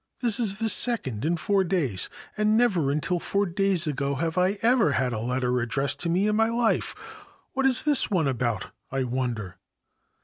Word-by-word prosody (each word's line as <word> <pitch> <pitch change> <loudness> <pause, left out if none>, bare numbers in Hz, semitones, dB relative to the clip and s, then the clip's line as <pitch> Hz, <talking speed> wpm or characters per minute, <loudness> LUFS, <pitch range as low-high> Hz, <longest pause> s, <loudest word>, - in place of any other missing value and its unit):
This 235 -3 +1
is 200 -5 0
the 225 +1 -1
second 180 - 0
in 170 +2 +1
four 195 +4 +1
days, 155 - 0 0.3
and 215 +1 +2
never 190 - +2
until 155 +5 -1
four 200 +4 0
days 190 -1 +1
ago 140 -2 -2
have 160 +3 -2
I 185 +1 +2
had 150 - +2
a 110 - -2
letter 125 +1 -1
addressed 135 +3 -1
to 170 - -2
me 180 +4 +2
in 210 - +1
my 225 +1 +3
life. 230 -1 0 0.6
What 270 0 +2
is 255 -2 +2
this 295 -3 +2
one 175 -7 +1
about, 120 -3 -2 0.2
I 135 0 -1
wonder 120 -6 -3
170 Hz, 180 wpm, -26 LUFS, 130-210 Hz, 0.6 s, my